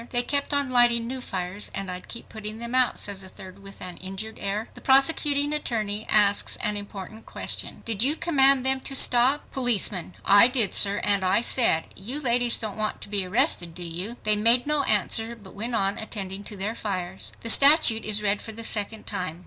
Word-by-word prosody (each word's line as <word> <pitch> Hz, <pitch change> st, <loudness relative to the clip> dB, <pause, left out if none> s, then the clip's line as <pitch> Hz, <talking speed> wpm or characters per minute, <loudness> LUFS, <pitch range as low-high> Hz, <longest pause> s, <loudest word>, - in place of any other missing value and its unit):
"They 245 Hz, 0 st, +1 dB
kept 280 Hz, +3 st, -1 dB
on 285 Hz, -2 st, +1 dB
lighting 240 Hz, -2 st, +3 dB
new 255 Hz, +2 st, -6 dB
fires, 185 Hz, -2 st, -5 dB
and 195 Hz, -1 st, -5 dB
I'd 180 Hz, 0 st, -9 dB
keep 235 Hz, -, -9 dB
putting 215 Hz, 0 st, -7 dB
them 235 Hz, +1 st, -7 dB
out," 255 Hz, -1 st, +2 dB
says 200 Hz, -1 st, -4 dB
a 190 Hz, -, -11 dB
third 190 Hz, 0 st, -13 dB
with 195 Hz, 0 st, -13 dB
an 180 Hz, -1 st, -8 dB
injured 195 Hz, +4 st, -7 dB
air. 205 Hz, +3 st, -3 dB
The -, -, -14 dB
prosecuting 285 Hz, +1 st, +3 dB
attorney 215 Hz, -7 st, -3 dB
asks 205 Hz, -1 st, +2 dB
an 210 Hz, -2 st, -3 dB
important 205 Hz, +1 st, -10 dB
question, -, -, -3 dB
"Did 220 Hz, -3 st, -3 dB
you 280 Hz, +5 st, +3 dB
command 275 Hz, -6 st, +2 dB
them 265 Hz, 0 st, +2 dB
to 270 Hz, -, -1 dB
stop?" 255 Hz, +3 st, +4 dB
Policeman—"I 205 Hz, -3 st, +2 dB
did 245 Hz, -6 st, -1 dB
sir, 200 Hz, 0 st, +1 dB
and 200 Hz, -2 st, +1 dB
I 185 Hz, +4 st, +2 dB
said, 230 Hz, -9 st, +2 dB
'You 240 Hz, +10 st, -5 dB
ladies 245 Hz, -3 st, +1 dB
don't 215 Hz, -2 st, -6 dB
want 215 Hz, 0 st, -3 dB
to -, -, -7 dB
be 200 Hz, -2 st, 0 dB
arrested 175 Hz, -2 st, +1 dB
do 180 Hz, -, -7 dB
you?' 180 Hz, +8 st, -5 dB
They 215 Hz, 0 st, +3 dB
made 230 Hz, +4 st, +3 dB
no 300 Hz, -1 st, +1 dB
answer 225 Hz, +2 st, -1 dB
but 205 Hz, -4 st, -16 dB
went 230 Hz, +4 st, -4 dB
on 195 Hz, 0 st, -1 dB
attending 200 Hz, -3 st, -6 dB
to 205 Hz, -, -7 dB
their 200 Hz, +3 st, -2 dB
fires." 190 Hz, -4 st, -5 dB
The 230 Hz, -, +1 dB
statute 275 Hz, -5 st, +6 dB
is 210 Hz, 0 st, -2 dB
read 205 Hz, 0 st, 0 dB
for 220 Hz, -, -9 dB
the 230 Hz, +1 st, -7 dB
second 215 Hz, 0 st, -2 dB
time. 180 Hz, -5 st, -4 dB
215 Hz, 205 wpm, -24 LUFS, 195-245 Hz, -, statute